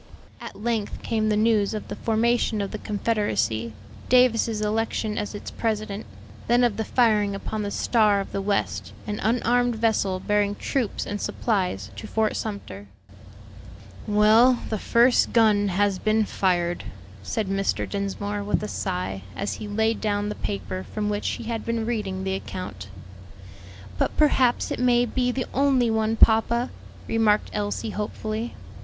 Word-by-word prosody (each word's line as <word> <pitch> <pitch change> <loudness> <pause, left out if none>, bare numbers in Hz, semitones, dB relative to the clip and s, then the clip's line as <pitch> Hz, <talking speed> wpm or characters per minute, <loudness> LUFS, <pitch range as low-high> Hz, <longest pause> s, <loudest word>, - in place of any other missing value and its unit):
At - - -8
length 225 -1 -2
came 220 -1 0
the 210 - +2
news 215 -1 +2
of 215 - -5
the - - -5
formation 230 0 +1
of 200 -1 -2
the 215 - -5
Confederacy: 205 - -1 0.4
Davis's 230 -3 +4
election 215 0 -1
as 210 0 -3
its 205 - -7
president; 215 -2 -3 0.4
then 240 +1 +4
of 235 -4 +2
the 220 - 0
firing 210 -4 +2
upon 215 +2 -4
the 205 - -2
Star 210 -1 +2
of 195 - -5
the 195 - -2
West, 200 0 -1
an 210 0 -3
unarmed 245 +1 +2
vessel 215 -4 +1
bearing 205 +1 +1
troops 250 -2 -2
and 205 0 -4
supplies 180 - -1
to 100 - -7
Fort 220 -1 0
Sumter. 100 - -6 1.2
"Well, 220 +4 +5
the 215 - -2
first 240 +4 +3
gun 215 -3 +4
has 195 0 +1
been 215 0 +2
fired," 175 -3 0 0.4
said 215 - -2
Mr. 195 0 -1
Dinsmore, 200 +1 -3
with 205 +1 0
a - - -2
sigh, 95 - -3
as 200 - -2
he 215 - -6
laid 220 +2 0
down 205 -1 0
the - - -2
paper 95 - -4
from 210 -1 -2
which 205 0 -2
he - - -4
had 230 0 -3
been 230 -1 -2
reading 205 -5 -2
the 190 0 -1
account. 105 - -6 1.1
"But - - 0
perhaps 260 -5 +3
it - - -2
may 245 -1 +4
be 250 +1 0
the 255 0 -2
only 265 -3 +3
one, 220 0 +1
papa," 230 +2 +4 0.4
remarked 215 -2 +2
Elsie 205 +1 -2
hopefully. 215 +2 -4
215 Hz, 155 wpm, -25 LUFS, 200-230 Hz, 1.2 s, Well